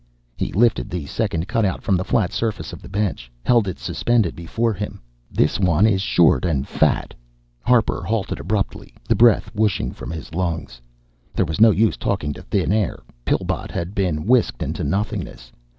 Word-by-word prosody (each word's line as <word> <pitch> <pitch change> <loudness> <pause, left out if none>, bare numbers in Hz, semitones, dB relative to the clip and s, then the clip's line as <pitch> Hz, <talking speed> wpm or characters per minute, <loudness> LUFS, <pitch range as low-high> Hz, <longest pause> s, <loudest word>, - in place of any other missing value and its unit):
He - - -3
lifted 105 - +2
the 85 -4 -4
second 90 -1 -2
cutout 110 -4 0
from 95 - +2
the 90 - 0
flat 100 -2 +1
surface 115 -2 -2
of - - -9
the - - -11
bench, 95 - -2
held 120 - +3
it 90 - -3
suspended 115 -7 0
before 110 +7 -1
him. 100 0 -5 0.3
"This 75 +9 +1
one 90 0 +3
is 100 -4 +3
short 85 -4 +4
and 75 -6 0
fat - - +1 0.3
" - - -40
Harper 120 -4 +3
halted 105 +3 -2
abruptly, 100 +1 -3
the - - +4
breath 115 -3 +4
whooshing 105 - 0
from - - -8
his 80 -1 -7
lungs. 85 -8 -3 0.5
There 95 - +2
was 80 +5 -3
no 115 - +9
use 110 +1 +2
talking 75 -7 -1
to - - -10
thin - - 0
air. 105 -3 -1 0.2
Pillbot - - -1
had 85 +3 -4
been 90 -7 -1
whisked 120 - +2
into - - -3
nothingness. 95 -11 -3
95 Hz, 180 wpm, -21 LUFS, 80-110 Hz, 0.5 s, no